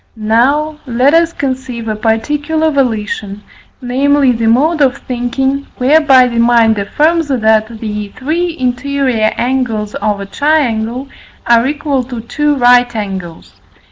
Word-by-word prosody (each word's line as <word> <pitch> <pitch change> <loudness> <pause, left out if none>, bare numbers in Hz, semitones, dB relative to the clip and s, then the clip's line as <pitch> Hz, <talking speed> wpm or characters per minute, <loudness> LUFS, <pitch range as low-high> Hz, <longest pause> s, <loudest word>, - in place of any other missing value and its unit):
Now 260 +8 +1
let 255 +4 +2
us 335 0 +3
conceive 260 -5 -4
a 215 - -2
particular 295 +9 -1
volition, 215 -6 -2 0.4
namely, 275 +2 +2
the 230 -1 -1
mode 295 +8 +2
of 270 -1 +2
thinking 265 +3 -3
whereby 270 -1 +4
the 235 -1 -2
mind 230 -2 +3
affirms, 310 +10 0
that 220 -5 +2
the 210 -2 -5
three 330 +6 -2
interior 255 -3 0
angles 235 -4 -2
of 210 -1 -2
a 200 - -6
triangle 255 -1 -1 0.4
are 235 +1 +3
equal 290 -2 -1
to 245 -2 -7
two 295 +5 -1
right 245 -2 +3
angles. 190 -6 -7
250 Hz, 130 wpm, -13 LUFS, 225-285 Hz, 0.4 s, whereby